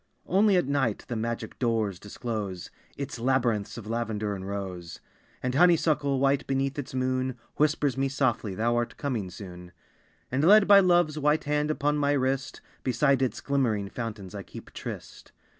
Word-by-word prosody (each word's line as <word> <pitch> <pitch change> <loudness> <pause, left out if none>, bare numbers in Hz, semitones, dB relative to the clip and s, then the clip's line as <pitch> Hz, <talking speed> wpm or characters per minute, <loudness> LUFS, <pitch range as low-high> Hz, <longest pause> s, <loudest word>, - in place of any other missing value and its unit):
Only 200 +1 +4
at 175 - +2
night 135 -6 0
the 120 - -2
magic 115 0 -4
doors 110 -6 0
disclose 105 -4 -5 0.3
Its 140 -3 -5
labyrinths 120 -4 0
of 115 - -8
lavender 110 -2 -2
and 95 -1 -6
rose; 95 -4 -5 0.4
And 125 0 -1
honeysuckle, 150 -4 +3
white 135 +1 +2
beneath 135 +1 -1
its 130 -2 -6
moon, 130 0 -1 0.2
Whispers 150 -3 +2
me 135 0 +1
softly 120 -7 0
thou 115 +3 +1
art 120 0 -2
coming 120 -10 -2
soon; 90 -1 -10 0.6
And 135 +3 +1
led 205 +4 +7
by 200 0 +9
Love's 175 -5 +3
white 150 +1 +2
hand 150 +1 0
upon 150 -1 0
my 145 0 +2
wrist 135 -1 -1 0.2
Beside 135 +2 +2
its 130 - -1
glimmering 115 -8 0
fountains 105 -6 -6
I - - -5
keep - - -12
tryst. - - -8
130 Hz, 160 wpm, -27 LUFS, 110-145 Hz, 0.6 s, by